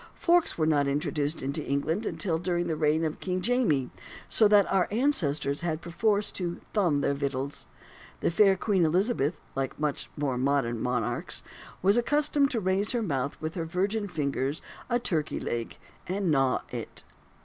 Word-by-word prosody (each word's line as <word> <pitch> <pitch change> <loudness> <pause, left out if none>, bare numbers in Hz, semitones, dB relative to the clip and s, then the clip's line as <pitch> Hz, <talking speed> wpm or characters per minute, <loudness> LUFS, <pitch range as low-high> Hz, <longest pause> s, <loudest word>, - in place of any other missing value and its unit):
Forks 345 -1 +2
were 160 - +2
not 145 -3 +2
introduced 145 +1 -1
into 140 +3 -2
England 160 +10 -1
until 165 -5 -1
during 175 0 -1
the 165 -2 -1
reign 155 +1 +2
of 155 - -3
King 185 -1 -2
"Jamie": 185 - +1 0.4
so 220 - +5
that 205 -1 +6
our 190 -2 +3
ancestors 155 - +1
had 160 -2 -1
perforce 205 +5 0
to 175 -2 -4
"thumb" 175 -9 +2
their 140 - +1
victuals. 140 0 -3 0.5
The - - +1
fair 195 +2 +5
Queen 190 -2 +1
Elizabeth 170 - +1
(like 135 +1 -3
much 150 -2 -2
more 135 -4 -1
modern 130 -4 +1
monarchs) 125 +1 -2 0.4
was 200 +4 +4
accustomed 290 +2 +2
to 240 - -1
raise 190 +1 +1
to 250 - +1
her 230 - -1
mouth 140 -6 -2
with 155 0 -4
her 165 -3 -3
virgin 200 +5 -1
fingers 145 -3 -2 0.3
a 240 - +3
turkey 165 -10 -1
leg 115 -1 -4 0.3
and 185 -1 0
gnaw 135 -3 +2
it. - - -6
165 Hz, 170 wpm, -28 LUFS, 140-200 Hz, 0.5 s, that